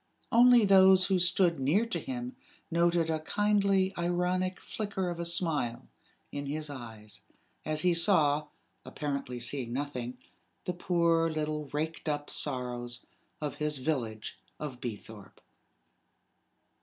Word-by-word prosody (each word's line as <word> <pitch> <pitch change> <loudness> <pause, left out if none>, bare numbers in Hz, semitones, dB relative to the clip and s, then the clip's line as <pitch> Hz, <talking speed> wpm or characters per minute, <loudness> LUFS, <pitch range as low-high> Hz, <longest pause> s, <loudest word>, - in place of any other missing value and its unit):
Only 240 -1 +7
those 190 -1 +7
who 190 -1 +2
stood 175 -2 +4
near 155 - +2
to 230 - -2
him 250 -1 -5 0.4
noted 170 0 +2
a 160 - 0
kindly 200 +1 +2
ironic 180 +1 0
flicker 195 -4 -3
of 170 - -6
a 170 - -2
smile 150 -8 0 0.4
in 145 0 -5
his 150 +1 -4
eyes, 110 -5 -9 0.4
as 155 0 -1
he 180 +1 +3
saw, 155 -4 +3 0.4
apparently 140 -4 -4
seeing 120 0 -3
nothing, 125 -3 -4 0.5
the 180 - -1
poor 170 -2 +2
little 155 -1 -2
raked 155 +2 -3
up 145 0 -2
sorrows 125 -3 -2 0.3
of 150 -1 -4
his 150 -1 0
village 120 -9 -3 0.2
of 135 -5 -6
Beethorpe. 110 -3 -8
155 Hz, 125 wpm, -30 LUFS, 135-185 Hz, 0.5 s, Only